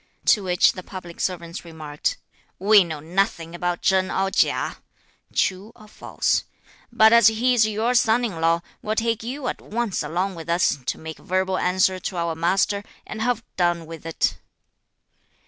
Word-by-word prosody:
To 210 Hz, -, +4 dB
which 180 Hz, -1 st, +4 dB
the 185 Hz, -, -8 dB
public 180 Hz, -2 st, -10 dB
servants 170 Hz, -1 st, -3 dB
remarked: 155 Hz, -3 st, -4 dB, 0.4 s
"We 205 Hz, +1 st, +6 dB
know 160 Hz, -3 st, -6 dB
nothing 170 Hz, 0 st, -1 dB
about 175 Hz, 0 st, -2 dB
Chen 190 Hz, -1 st, +2 dB
or 195 Hz, 0 st, 0 dB
Chia -, -, +1 dB, 0.5 s
(true 190 Hz, +4 st, -1 dB
or 215 Hz, -, -16 dB
false); -, -, -1 dB, 0.5 s
but 220 Hz, -1 st, +6 dB
as 235 Hz, -2 st, +7 dB
he 230 Hz, +3 st, +3 dB
is 225 Hz, -3 st, +4 dB
your 220 Hz, +3 st, 0 dB
son 245 Hz, 0 st, +3 dB
in 180 Hz, -8 st, -5 dB
law, 165 Hz, +1 st, +2 dB, 0.2 s
we'll 215 Hz, +1 st, -2 dB
take 230 Hz, 0 st, 0 dB
you 255 Hz, +4 st, -5 dB
at -, -, -4 dB
once 230 Hz, -2 st, -2 dB
along 185 Hz, +4 st, -2 dB
with 165 Hz, -1 st, -9 dB
us 170 Hz, -4 st, +2 dB
to -, -, -2 dB
make 160 Hz, 0 st, -8 dB
verbal 185 Hz, +1 st, -1 dB
answer 185 Hz, +1 st, +2 dB
to 185 Hz, -, -5 dB
our 170 Hz, -1 st, -1 dB
master 190 Hz, +5 st, +1 dB, 0.2 s
and 220 Hz, -, -7 dB
have 235 Hz, 0 st, 0 dB
done 175 Hz, -2 st, +1 dB
with 165 Hz, 0 st, -9 dB
it." 165 Hz, -, -1 dB
185 Hz, 170 wpm, -23 LUFS, 170-220 Hz, 0.5 s, as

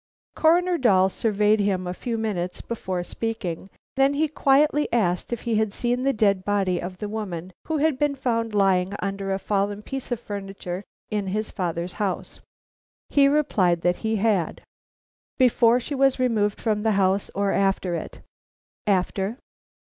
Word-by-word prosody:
Coroner 345 Hz, +2 st, +3 dB
Dahl 190 Hz, -6 st, +4 dB
surveyed 210 Hz, +1 st, +2 dB
him 195 Hz, -3 st, 0 dB
a 180 Hz, -, -3 dB
few 230 Hz, +5 st, -3 dB
minutes 190 Hz, -5 st, -2 dB
before 185 Hz, -6 st, -4 dB
speaking, 195 Hz, -4 st, -4 dB, 0.3 s
then 270 Hz, +1 st, +3 dB
he 310 Hz, +2 st, +2 dB
quietly 295 Hz, +1 st, +2 dB
asked 180 Hz, -6 st, 0 dB
if 240 Hz, -, -3 dB
he 230 Hz, -2 st, 0 dB
had 215 Hz, -2 st, 0 dB
seen 245 Hz, +1 st, 0 dB
the 275 Hz, +1 st, +2 dB
dead 200 Hz, -5 st, +2 dB
body 195 Hz, -3 st, 0 dB
of 185 Hz, +1 st, -6 dB
the 210 Hz, -, -4 dB
woman 190 Hz, -5 st, -5 dB
who 320 Hz, -, 0 dB
had 295 Hz, -2 st, +1 dB
been 295 Hz, -1 st, +1 dB
found 230 Hz, -4 st, -1 dB
lying 195 Hz, -1 st, +2 dB
under 195 Hz, 0 st, -3 dB
a 190 Hz, -, +1 dB
fallen 205 Hz, +1 st, -1 dB
piece 270 Hz, 0 st, -6 dB
of 240 Hz, -, -1 dB
furniture 195 Hz, -3 st, -6 dB, 0.3 s
in 205 Hz, -2 st, -1 dB
his 215 Hz, +3 st, -2 dB
father's 175 Hz, -1 st, -3 dB
house. 195 Hz, -3 st, -3 dB, 0.7 s
He 280 Hz, -1 st, +5 dB
replied 200 Hz, -, +2 dB
that 175 Hz, +1 st, +1 dB
he 220 Hz, 0 st, -1 dB
had. 200 Hz, -5 st, 0 dB, 0.7 s
"Before 245 Hz, -2 st, +4 dB
she 255 Hz, -, -5 dB
was 270 Hz, -1 st, +3 dB
removed 220 Hz, -5 st, +1 dB
from 215 Hz, -2 st, 0 dB
the 220 Hz, 0 st, +2 dB
house 195 Hz, 0 st, +1 dB
or 200 Hz, 0 st, +1 dB
after 195 Hz, -2 st, +1 dB
it?" 165 Hz, -, -6 dB, 0.7 s
"After." 195 Hz, +3 st, 0 dB
210 Hz, 165 wpm, -24 LUFS, 190-240 Hz, 0.7 s, He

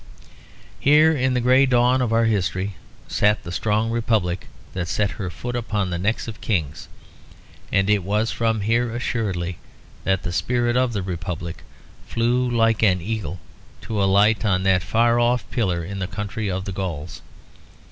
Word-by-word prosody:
Here 155 Hz, +3 st, +5 dB
in 130 Hz, -2 st, +1 dB
the -, -, +2 dB
grey 130 Hz, +3 st, +4 dB
dawn 125 Hz, +1 st, +3 dB
of 120 Hz, -3 st, 0 dB
our 115 Hz, 0 st, +3 dB
history 95 Hz, -2 st, 0 dB, 0.3 s
sat 105 Hz, +1 st, +2 dB
the 85 Hz, -, -7 dB
strong 110 Hz, +5 st, 0 dB
Republic 110 Hz, -6 st, 0 dB, 0.3 s
that 90 Hz, -2 st, -3 dB
set 100 Hz, +4 st, 0 dB
her 100 Hz, -3 st, -5 dB
foot 120 Hz, +7 st, -5 dB
upon 105 Hz, -5 st, -1 dB
the 85 Hz, -, -2 dB
necks 110 Hz, +6 st, -1 dB
of 115 Hz, -, -8 dB
kings; 80 Hz, -9 st, -2 dB, 0.8 s
and 95 Hz, -1 st, +2 dB
it 105 Hz, -1 st, +3 dB
was 105 Hz, +4 st, 0 dB
from 110 Hz, -2 st, 0 dB
here 115 Hz, +3 st, +1 dB
assuredly 95 Hz, -8 st, -2 dB, 0.4 s
that 95 Hz, -1 st, 0 dB
the 90 Hz, -, -3 dB
spirit 120 Hz, +3 st, 0 dB
of 125 Hz, -1 st, +2 dB
the 100 Hz, -3 st, -2 dB
Republic 85 Hz, -2 st, -5 dB, 0.5 s
flew 120 Hz, +2 st, +1 dB
like 115 Hz, -2 st, +2 dB
an 95 Hz, -5 st, +4 dB
eagle 100 Hz, -1 st, -4 dB, 0.4 s
to 105 Hz, -3 st, -2 dB
alight 100 Hz, +3 st, +3 dB
on 95 Hz, -3 st, +1 dB
that 95 Hz, -2 st, +3 dB
far 115 Hz, +7 st, +2 dB
off 120 Hz, +1 st, +1 dB
pillar 90 Hz, -8 st, 0 dB
in 100 Hz, +2 st, -5 dB
the 90 Hz, -, -2 dB
country 100 Hz, +1 st, -4 dB
of 95 Hz, +1 st, -3 dB
the 100 Hz, -, -4 dB
Gauls. 85 Hz, -4 st, -5 dB
105 Hz, 165 wpm, -22 LUFS, 95-120 Hz, 0.8 s, Here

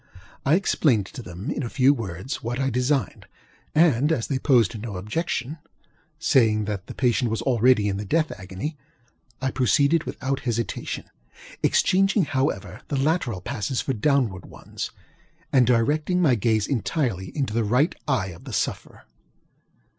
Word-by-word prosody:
I 150 Hz, -, +5 dB
explained 140 Hz, -, +2 dB
to 125 Hz, -, -9 dB
them, 95 Hz, -, -6 dB
in -, -, -2 dB
a 120 Hz, -, -3 dB
few 135 Hz, +3 st, +4 dB
words, 100 Hz, -2 st, -5 dB
what 120 Hz, +2 st, -3 dB
I 135 Hz, 0 st, 0 dB
designed, 125 Hz, -1 st, -1 dB, 0.5 s
and 150 Hz, -3 st, +4 dB
as 130 Hz, -8 st, 0 dB
they 135 Hz, -, -1 dB
opposed 125 Hz, -5 st, +3 dB
no 110 Hz, -3 st, -5 dB
objection, 130 Hz, -, -3 dB, 0.6 s
saying 115 Hz, -9 st, +3 dB
that 100 Hz, -2 st, -4 dB
the -, -, -8 dB
patient 120 Hz, -2 st, +1 dB
was 115 Hz, +1 st, -2 dB
already 125 Hz, -3 st, +3 dB
in 100 Hz, -1 st, -1 dB
the 105 Hz, -, -4 dB
death 155 Hz, +9 st, +1 dB
agony, 95 Hz, +12 st, -5 dB, 0.7 s
I 130 Hz, -, +1 dB
proceeded 140 Hz, +7 st, +2 dB
without 135 Hz, +1 st, -3 dB
hesitationŌĆöexchanging, 125 Hz, -, -1 dB
however, 140 Hz, 0 st, -2 dB
the 140 Hz, -, -2 dB
lateral 135 Hz, -, 0 dB
passes 115 Hz, +7 st, -2 dB
for 135 Hz, -, -2 dB
downward 115 Hz, -, 0 dB
ones, -, -, -7 dB, 0.6 s
and 130 Hz, -4 st, +5 dB
directing 150 Hz, +9 st, +2 dB
my 155 Hz, -8 st, +4 dB
gaze 110 Hz, -1 st, +1 dB
entirely 115 Hz, -, -1 dB
into 135 Hz, -7 st, -1 dB
the 115 Hz, 0 st, +1 dB
right 125 Hz, -, +2 dB
eye 120 Hz, -9 st, 0 dB
of 85 Hz, -2 st, -12 dB
the -, -, -7 dB
sufferer. -, -, -3 dB
125 Hz, 150 wpm, -24 LUFS, 110-145 Hz, 0.7 s, I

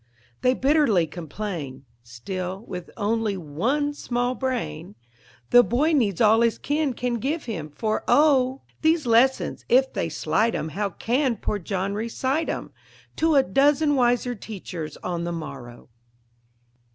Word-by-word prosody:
They 255 Hz, +1 st, +3 dB
bitterly 270 Hz, -, +3 dB
complain; 160 Hz, -5 st, -6 dB, 0.2 s
still, 180 Hz, -, -6 dB
with 180 Hz, -1 st, -7 dB
only 215 Hz, -1 st, 0 dB
one 230 Hz, -, -1 dB
small 245 Hz, -3 st, -1 dB
brain, 235 Hz, -8 st, -4 dB, 0.6 s
The 245 Hz, -, +9 dB
boy 285 Hz, +8 st, +1 dB
needs 215 Hz, -, +1 dB
all 220 Hz, 0 st, +5 dB
his 230 Hz, -1 st, +2 dB
kin 290 Hz, -2 st, -1 dB
can 245 Hz, -1 st, -2 dB
give 300 Hz, +7 st, -2 dB
him, 170 Hz, -10 st, -5 dB
for 215 Hz, +9 st, -2 dB
oh! 270 Hz, -3 st, +3 dB, 0.2 s
These 320 Hz, -2 st, +2 dB
lessons, 245 Hz, +3 st, +2 dB
if 265 Hz, +2 st, +4 dB
they 165 Hz, -, -1 dB
slight 210 Hz, +8 st, 0 dB
'em, 160 Hz, -, -3 dB
how 200 Hz, +5 st, -2 dB
can 245 Hz, -, 0 dB
poor 205 Hz, -, -2 dB
John 195 Hz, +1 st, -2 dB
recite 260 Hz, +8 st, -1 dB
'em -, -, -4 dB, 0.5 s
To 320 Hz, -1 st, +2 dB
a 275 Hz, -, +6 dB
dozen 290 Hz, +7 st, +3 dB
wiser 245 Hz, -1 st, +2 dB
teachers 185 Hz, -8 st, -7 dB
on 175 Hz, -2 st, -2 dB
the 175 Hz, -, -3 dB
morrow. 140 Hz, -7 st, -8 dB
225 Hz, 140 wpm, -24 LUFS, 180-265 Hz, 0.6 s, The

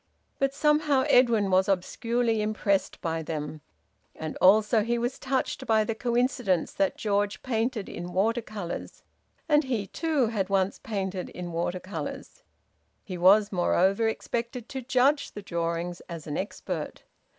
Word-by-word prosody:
But 275 Hz, 0 st, +2 dB
somehow 300 Hz, -1 st, +2 dB
Edwin 230 Hz, -6 st, +4 dB
was 190 Hz, +2 st, +3 dB
obscurely 230 Hz, +4 st, 0 dB
impressed 210 Hz, -2 st, 0 dB
by 165 Hz, -1 st, -2 dB
them, 155 Hz, -1 st, -5 dB, 0.5 s
and 155 Hz, -1 st, -5 dB
also 215 Hz, +3 st, +5 dB
he 235 Hz, +3 st, 0 dB
was 240 Hz, +2 st, -2 dB
touched 265 Hz, 0 st, -2 dB
by 220 Hz, -1 st, +4 dB
the 225 Hz, -, -2 dB
coincidence 240 Hz, -5 st, 0 dB
that 295 Hz, -1 st, 0 dB
George 205 Hz, -1 st, -1 dB
painted 230 Hz, -3 st, -1 dB
in 175 Hz, +1 st, -6 dB
water 220 Hz, +6 st, +1 dB
colours, 200 Hz, -6 st, -7 dB, 0.4 s
and 295 Hz, -2 st, +4 dB
he, 235 Hz, -6 st, -1 dB
too, 310 Hz, -, 0 dB
had 205 Hz, -4 st, -1 dB
once 195 Hz, 0 st, +1 dB
painted 190 Hz, -4 st, -3 dB
in 175 Hz, -1 st, -7 dB
water 175 Hz, +2 st, -2 dB
colours. 195 Hz, -, -7 dB, 0.6 s
He 185 Hz, -, -6 dB
was 200 Hz, +4 st, +6 dB
moreover 190 Hz, +3 st, +2 dB
expected 235 Hz, +1 st, -3 dB
to 265 Hz, -, -4 dB
judge 265 Hz, +3 st, +2 dB
the 205 Hz, -, -8 dB
drawings 170 Hz, 0 st, -3 dB
as 165 Hz, -3 st, -7 dB
an 150 Hz, -, -4 dB
expert. 195 Hz, -, -4 dB
210 Hz, 145 wpm, -27 LUFS, 185-245 Hz, 0.6 s, was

